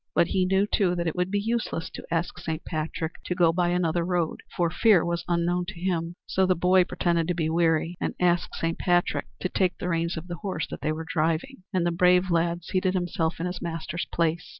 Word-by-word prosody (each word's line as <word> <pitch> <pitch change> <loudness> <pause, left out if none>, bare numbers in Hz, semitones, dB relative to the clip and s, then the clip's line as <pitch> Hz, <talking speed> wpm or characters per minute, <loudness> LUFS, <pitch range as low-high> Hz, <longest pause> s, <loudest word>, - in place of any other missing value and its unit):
But 170 - +4
he 185 -1 +1
knew, 195 +1 +3
too, 190 -3 +1
that 170 -1 -2
it 165 - -1
would 180 0 0
be 205 +1 +1
useless 220 -6 -2
to - - -8
ask 170 +1 -1
Saint 160 -2 -4
Patrick 160 +1 -4
to 180 - -2
go 170 -2 +4
by 175 0 +1
another 175 -1 +1
road, 175 -2 -1 0.2
for 170 -2 +2
fear 200 -2 +4
was 170 0 -1
unknown 175 +1 +1
to 190 -2 -7
him. 170 -2 -1
So 190 0 +1
the 185 - +3
boy 180 +1 +4
pretended 170 -2 0
to 180 - 0
be 160 -2 0
weary 165 +1 +1
and - - -2
asked 175 -1 +1
Saint 165 0 -2
Patrick 175 -1 +1
to - - +1
take 180 -1 0
the 180 - -3
reins 170 0 0
of 165 - -6
the 175 -1 -5
horse 185 -4 -3
that - - -6
they 155 - 0
were 160 +1 -4
driving; 165 - 0
and 185 -4 +1
the 175 - +2
brave 180 +1 +4
lad 170 0 +1
seated 185 +1 0
himself 175 -2 -1
in 170 - -2
his 180 0 -4
master's 165 0 -4
place. 165 0 0
175 Hz, 230 wpm, -26 LUFS, 165-180 Hz, 0.2 s, But